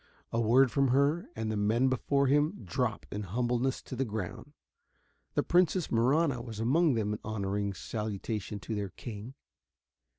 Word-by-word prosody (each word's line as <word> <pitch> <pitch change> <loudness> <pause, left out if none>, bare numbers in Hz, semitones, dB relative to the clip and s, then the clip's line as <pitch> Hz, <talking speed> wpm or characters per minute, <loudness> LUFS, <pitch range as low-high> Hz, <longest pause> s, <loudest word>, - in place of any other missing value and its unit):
A 115 - +1
word 125 +3 +5
from 140 -1 +3
her, 140 +6 +2
and 110 -1 -2
the - - -1
men 110 +5 +2
before 140 +2 +1
him 145 -1 +2
dropped 110 +5 -1
in 105 - -3
humbleness 120 +6 -1
to - - -7
the 130 - 0
ground. 110 +5 -5 0.8
The - - +2
Princess 175 0 +2
Marahna 130 +3 +2
was 115 -3 -7
among 140 +5 +3
them 105 -2 0
in 105 - -4
honoring 100 -2 -2
salutation 105 -1 -4
to 110 - -5
their 100 -2 -2
king. 115 +5 -8
120 Hz, 160 wpm, -30 LUFS, 105-135 Hz, 0.8 s, word